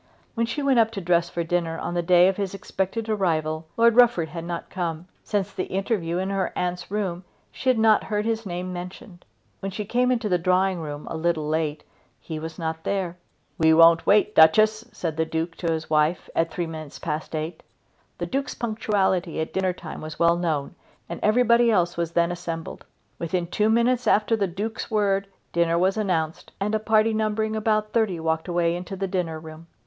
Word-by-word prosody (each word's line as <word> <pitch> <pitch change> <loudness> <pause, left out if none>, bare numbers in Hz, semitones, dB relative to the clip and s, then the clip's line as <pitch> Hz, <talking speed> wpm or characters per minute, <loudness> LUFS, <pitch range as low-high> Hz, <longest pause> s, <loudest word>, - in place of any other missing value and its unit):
When 230 0 0
she 255 +6 -3
went 270 -3 +4
up 225 -1 +4
to 200 - -3
dress 170 -1 +1
for 170 - -2
dinner 165 -1 -1
on 175 - -4
the 175 - 0
day 175 +1 +5
of 190 - +1
his 200 -1 -3
expected 195 +2 -3
arrival 160 -6 -1
Lord 230 0 +5
Rufford 230 -10 +5
had 165 -1 -6
not 170 0 -5
come. 170 -2 -3 0.2
Since 200 -2 -2
the 185 - -2
interview 190 -3 -1
in 190 +2 -2
her 195 -1 -1
aunt's 180 0 -3
room 190 -3 -2 0.3
she 260 - -2
had 255 - +3
not 220 -1 +4
heard 210 -1 -1
his 225 0 -1
name 180 -1 -4
mentioned. 180 0 -9 0.3
When 195 - -4
she 205 +2 -4
came 250 +4 +1
into 235 -3 0
the 180 -3 +1
drawing 185 +1 +2
room, 150 -2 -6
a - - -3
little 160 -2 0
late, 155 -1 -1 0.4
he 160 -2 -6
was 160 +1 -7
not 160 -1 -4
there. 190 -3 -2 0.4
"We 160 0 +5
won't 165 0 +6
wait, 210 +1 +4
Duchess," 215 +8 +5
said 165 -7 -4
the 160 - +1
Duke 160 +1 -3
to 170 -2 -1
his 160 -1 -2
wife 155 +2 +1
at 165 0 +2
three 175 - -2
minutes 155 -3 -8
past 155 0 -4
eight. 160 +2 -4 0.6
The - - -3
Duke's 275 +2 -3
punctuality 195 -7 0
at 160 - -3
dinner 190 -1 +1
time 175 -2 -8
was 155 0 -7
well 170 0 +4
known, 160 -5 -2 0.4
and 170 - -5
everybody 235 +1 +4
else 175 -5 +2
was 170 -1 -2
then 170 0 +2
assembled. 170 -2 -6 0.3
Within 170 +1 -1
two 210 +5 +1
minutes 235 +2 +2
after 215 +2 +3
the 200 -3 0
Duke's 205 +6 -4
word 200 -3 +1 0.3
dinner 170 0 +2
was 185 +2 +2
announced, 170 -7 -2
and 205 +2 -1
a 220 - +2
party 220 +1 +3
numbering 215 0 0
about 215 -1 0
thirty 215 -7 +1
walked 160 +1 -1
away 170 -1 +1
into 180 +2 -6
the 195 +1 -2
dinner 175 -4 -2
room. 160 +1 -11
180 Hz, 200 wpm, -24 LUFS, 165-215 Hz, 0.6 s, won't